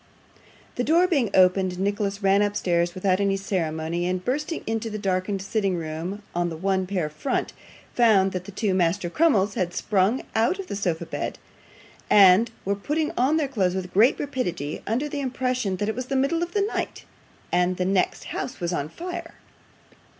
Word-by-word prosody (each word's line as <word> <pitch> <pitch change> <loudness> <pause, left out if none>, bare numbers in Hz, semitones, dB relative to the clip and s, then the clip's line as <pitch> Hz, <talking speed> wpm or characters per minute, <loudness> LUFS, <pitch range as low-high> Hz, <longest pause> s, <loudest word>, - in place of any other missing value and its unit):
The 245 - +1
door 335 +6 +4
being 280 - +1
opened, 185 0 +4
Nicholas 200 +1 -1
ran 195 +1 +4
upstairs 175 -4 0
without 185 0 +1
any 200 -1 +1
ceremony, 170 -3 -2
and 185 0 -2
bursting 300 +6 -2
into 225 0 -2
the 215 - -4
darkened 195 -1 -1
sitting 195 -2 0
room 170 +5 -5
on 175 0 0
the 165 - -6
one 190 +1 0
pair 180 -5 -1
front, 150 - -2 0.4
found 210 -5 +4
that 185 -1 -4
the 200 - -8
two 200 0 -1
Master 175 0 +1
Crummleses 215 - +3
had 180 -2 -2
sprung 205 +5 +1
out 230 +11 +2
of 390 - -6
the 200 - -5
sofa 180 -5 -1
bedstead - - -4 0.7
and 200 +3 +7 0.2
were 200 - +1
putting 300 +10 -1
on 270 +6 +2
their 305 -3 +1
clothes 190 -9 0
with 185 -1 -4
great 220 +7 +4
rapidity, 180 - -3
under 245 +7 0
the 290 -1 -4
impression 255 -6 -1
that 205 - -2
it 220 - 0
was 255 +1 -5
the 275 - -2
middle 275 +6 +1
of 345 0 -3
the 410 - +2
night, 410 - -3 0.5
and 180 +1 +2
the 180 - 0
next 190 0 +1
house 250 - -5
was 175 -1 -2
on 145 -2 -2
fire. 355 - -7
200 Hz, 185 wpm, -25 LUFS, 180-245 Hz, 0.7 s, and